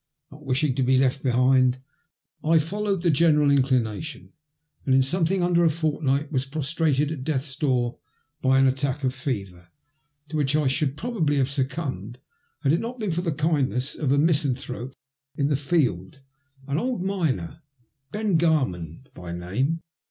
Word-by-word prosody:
Not -, -, -13 dB
wishing 135 Hz, +1 st, +1 dB
to 135 Hz, -, -2 dB
be 130 Hz, +1 st, +3 dB
left 130 Hz, +1 st, +1 dB
behind 130 Hz, 0 st, +3 dB, 0.7 s
I 160 Hz, +1 st, +4 dB
followed 195 Hz, +3 st, -1 dB
the 170 Hz, -, +4 dB
general 150 Hz, -1 st, +4 dB
inclination, 130 Hz, +1 st, 0 dB, 0.5 s
and 130 Hz, -, +2 dB
in 135 Hz, -, +5 dB
something 175 Hz, +5 st, +1 dB
under 175 Hz, -1 st, +3 dB
a 165 Hz, -, +5 dB
fortnight 150 Hz, -2 st, -1 dB
was 130 Hz, -3 st, 0 dB
prostrated 150 Hz, 0 st, 0 dB
at 145 Hz, -5 st, -5 dB
death's 135 Hz, -2 st, -2 dB
door 125 Hz, -5 st, 0 dB, 0.4 s
by 130 Hz, 0 st, +3 dB
an 135 Hz, -, +5 dB
attack 135 Hz, +2 st, 0 dB
of 130 Hz, -1 st, +1 dB
fever, 100 Hz, -10 st, -5 dB, 0.6 s
to 155 Hz, -, -3 dB
which 145 Hz, -1 st, +1 dB
I 155 Hz, -1 st, +2 dB
should 135 Hz, +1 st, 0 dB
probably 185 Hz, -11 st, -1 dB
have 135 Hz, 0 st, +1 dB
succumbed 130 Hz, -, -3 dB, 0.4 s
had 140 Hz, -1 st, +2 dB
it 165 Hz, -, +2 dB
not 240 Hz, +2 st, -5 dB
been 210 Hz, -4 st, -1 dB
for 170 Hz, +2 st, -1 dB
the 175 Hz, -2 st, -1 dB
kindness 145 Hz, -3 st, 0 dB
of 145 Hz, -4 st, -1 dB
a 140 Hz, -, +3 dB
misanthrope 140 Hz, -4 st, 0 dB, 0.4 s
of 140 Hz, 0 st, +1 dB
the 145 Hz, -, +2 dB
field, 135 Hz, -, -1 dB, 0.4 s
an 140 Hz, +2 st, -1 dB
old 245 Hz, -5 st, -2 dB
miner, 160 Hz, -, -2 dB, 0.5 s
Ben 210 Hz, -5 st, +1 dB
Oarman 130 Hz, -, 0 dB
by 90 Hz, -1 st, -8 dB
name. 120 Hz, -, -2 dB
140 Hz, 160 wpm, -25 LUFS, 130-160 Hz, 0.7 s, in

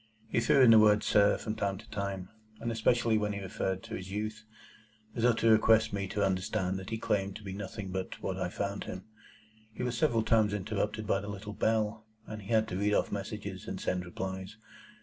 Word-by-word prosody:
He -, -, +2 dB
threw 135 Hz, +4 st, +4 dB
in 120 Hz, -, +8 dB
the 110 Hz, -, +9 dB
word, 105 Hz, -1 st, +5 dB
"Sir," 100 Hz, 0 st, +4 dB
from 110 Hz, -, -4 dB
time 100 Hz, -2 st, -1 dB
to 110 Hz, +3 st, -13 dB
time, 100 Hz, -3 st, -4 dB, 0.3 s
and 115 Hz, -, -2 dB
especially 115 Hz, 0 st, +2 dB
when 105 Hz, 0 st, -1 dB
he 100 Hz, -, -4 dB
referred 95 Hz, 0 st, -3 dB
to 115 Hz, 0 st, -9 dB
his 95 Hz, -3 st, -5 dB
youth,—as 110 Hz, +1 st, -8 dB
though 120 Hz, +1 st, +5 dB
to 115 Hz, 0 st, +3 dB
request 110 Hz, -1 st, +5 dB
me 100 Hz, -1 st, -2 dB
to 100 Hz, +1 st, 0 dB
understand 95 Hz, 0 st, -1 dB
that 95 Hz, +2 st, -8 dB
he 115 Hz, -, -2 dB
claimed 100 Hz, -3 st, -1 dB
to 105 Hz, -, -9 dB
be 95 Hz, -2 st, -6 dB
nothing 100 Hz, 0 st, -6 dB
but 95 Hz, 0 st, -4 dB
what 95 Hz, -, -3 dB
I 90 Hz, -, -1 dB
found 100 Hz, +2 st, -3 dB
him. 90 Hz, 0 st, -6 dB, 0.7 s
He 110 Hz, -, -5 dB
was 125 Hz, -1 st, -1 dB
several 120 Hz, -5 st, +2 dB
times 110 Hz, -2 st, +3 dB
interrupted 105 Hz, +1 st, -2 dB
by 100 Hz, 0 st, +1 dB
the 100 Hz, -, -7 dB
little 105 Hz, +1 st, -6 dB
bell, 110 Hz, 0 st, 0 dB, 0.2 s
and 110 Hz, 0 st, -7 dB
had 110 Hz, +2 st, +1 dB
to 90 Hz, -, -3 dB
read 105 Hz, +1 st, +2 dB
off -, -, +1 dB
messages, -, -, -5 dB
and -, -, -4 dB
send 90 Hz, -1 st, -1 dB
replies. 95 Hz, +3 st, -6 dB
105 Hz, 210 wpm, -31 LUFS, 95-110 Hz, 0.7 s, the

